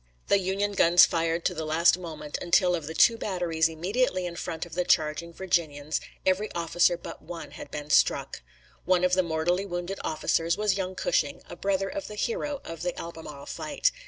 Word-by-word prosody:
The 200 - +5
Union 195 +2 -1
guns 175 -3 +6
fired 165 0 -1
to - - +2
the 160 - -4
last 160 +3 +4
moment, 155 -4 -7
until 180 +1 +3
of 165 -4 -3
the 160 - -6
two 230 +6 +5
batteries 170 -5 0
immediately 185 +4 0
in 175 -1 -5
front 165 -1 -4
of 170 - -13
the 180 +2 0
charging 160 0 +1
Virginians 160 -5 -1 0.2
every 190 +3 +1
officer 175 +1 +2
but - - -9
one 170 -2 -8
had - - -9
been 150 0 -6
struck. - - +2 0.4
One 180 -1 +3
of 180 0 +2
the 185 - +5
mortally 175 +3 0
wounded 175 +1 -4
officers 165 +1 0
was 210 -2 +1
young 190 -1 -3
Cushing, - - 0
a - - -8
brother 195 0 0
of 295 +4 -5
the 210 - -8
hero 275 +6 -2
of 165 -1 -7
the 180 0 -3
Albemarle 160 -4 -8
fight. 165 - -1
175 Hz, 190 wpm, -27 LUFS, 160-190 Hz, 0.4 s, guns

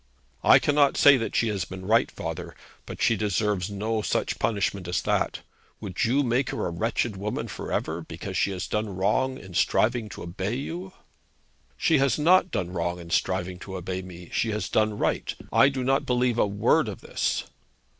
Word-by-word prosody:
'I - - +8
cannot 145 -1 +3
say 145 -1 +8
that 115 - -3
she 115 - +2
has 100 -4 -1
been 95 0 -8
right, 115 +4 +3
father; - - -6 0.3
but - - -5
she 115 -2 +4
deserves 105 -3 0
no 110 +2 -2
such - - -1
punishment 100 -4 -1
as 90 - 0
that. - - 0 0.4
Would 95 -5 -2
you 135 +5 +2
make 125 +1 +1
her - - -2
a 85 - -2
wretched 110 +4 -1
woman 100 +2 -3
for - - -6
ever, 80 +2 -2
because 85 +4 -7
she - - +2
has 95 -2 -4
done 105 -2 -2
wrong 120 +8 +1
in 95 -6 -12
striving 115 +4 +1
to - - -8
obey 95 +6 -3
you?' 175 +8 -5 0.9
'She 160 -4 +3
has 135 -3 +2
not 180 +4 +4
done 90 - -2
wrong 85 0 -1
in 85 -1 -10
striving 95 0 0
to 95 0 -8
obey 95 +1 -4
me. 90 -1 -11
She 115 - +1
has 105 0 -2
done 110 -1 +1
right. - - -1 0.2
I 135 - +6
do 135 -2 -3
not 135 +2 +1
believe 125 -1 +1
a - - +4
word 100 +1 +2
of - - -6
this.' - - -1
105 Hz, 195 wpm, -26 LUFS, 95-125 Hz, 0.9 s, I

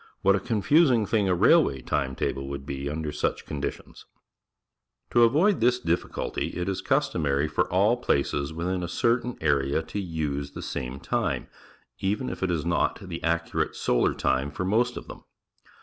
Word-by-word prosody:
What 100 0 +5
a - - 0
confus 130 - +3
i 125 - +4
n 110 -2 +1
g - - -13
thing 105 -4 +2
a 90 - +3
railway 70 -5 +4
time 65 -3 -1
table 70 +1 -2
would 70 0 -6
be 70 0 -4
under 75 0 -3
such - - -2
conditions! 70 -2 -6 1.1
To 120 - +4
avoid 155 - +4
this 125 +1 +4
difficulty, 85 -6 -2
jt 90 0 -3
is 95 -1 -2
cust - - +1
omary 70 -2 +1
for 75 - -1
all 105 +7 +3
plac(>s 70 +1 0
within 90 +3 -2
a 85 - -3
certain 120 +6 0
area 70 0 +1
to 100 - -5
use 75 -6 -3
the - - -7
same 65 0 -4
.time, - - -2 0.5
even 105 +7 -1
if - - -7
it 95 - 0
is 85 -2 -1
not 85 -1 +1
the - - -6
accurate 85 0 -1
solar - - +1
time 65 +2 0
for 90 +6 -4
most 120 +5 +1
of - - -8
them. - - -10
85 Hz, 185 wpm, -26 LUFS, 70-105 Hz, 1.1 s, What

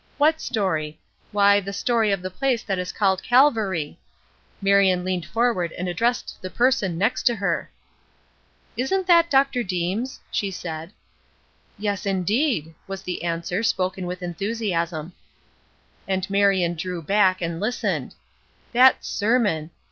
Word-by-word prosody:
What 310 +2 +3
story? 160 -9 -2 0.3
Why, 200 0 +5
the 200 0 -6
story 225 0 +1
of 195 -2 -1
the 185 - -4
place 245 +4 0
that 195 -3 -2
is 180 - -3
called 190 -2 +1
Calvary!" 220 - +2 0.6
Marion 195 -2 +3
leaned 180 -3 -2
forward 220 -6 0
and 180 - -4
addressed 230 +8 -1
the 185 - -5
person 210 -7 +1
next 205 +7 +1
to 240 - +3
her. 200 -2 -1 1.1
"Isn't 365 +10 0
that 340 -2 +5
Dr. 270 -3 +3
Deems?" 190 +6 -2
she 200 - -1
said. 165 -2 -6 0.9
"Yes 205 -1 -2
indeed!" 195 - 0
was 195 0 -6
the 180 -1 -4
answer, 170 +3 -2
spoken 185 -4 -1
with 180 0 -5
enthusiasm. 175 -3 -2 0.9
And 190 -1 -1
Marion 195 -3 +3
drew 175 0 -5
back, 190 +1 +3
and 170 -1 -3
listened. 220 +5 -2 0.6
That 255 +2 +5
sermon! 205 -8 +1
195 Hz, 135 wpm, -23 LUFS, 180-230 Hz, 1.1 s, Why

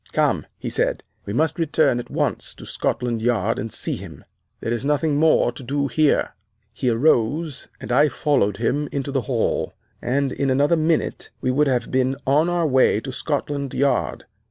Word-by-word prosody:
Come,' - - +1
he - - -5
said, - - 0 0.2
'we 100 - -3
must 160 +5 +1
return 155 -5 +2
at 120 - -7
once - - -2
to - - -11
Scotland 120 -1 -2
Yard 115 -1 +1
and 115 - -4
see - - -1
him. - - -11 0.3
There 115 - -3
is 120 - -3
nothing 145 +1 +1
more 155 -5 +4
to 120 - -10
do 140 +2 -1
here.' 150 +4 +2 0.4
"He 125 +3 -1
arose, 135 +4 +1
and - - -7
I 145 +5 +5
followed 125 -8 +1
him 140 +5 -1
into 140 0 -3
the 135 -1 0
hall, 120 -4 0 0.3
and 135 +2 0
in 140 - -1
another 145 +5 +3
minute 160 0 0
we 130 - 0
would 145 +3 +2
have 125 -3 0
been 130 +1 +1
on 150 +5 +3
our 175 -1 +1
way 130 -6 +3
to 130 +4 -6
Scotland 140 0 -3
Yard. 140 +1 0
135 Hz, 180 wpm, -22 LUFS, 120-150 Hz, 0.4 s, I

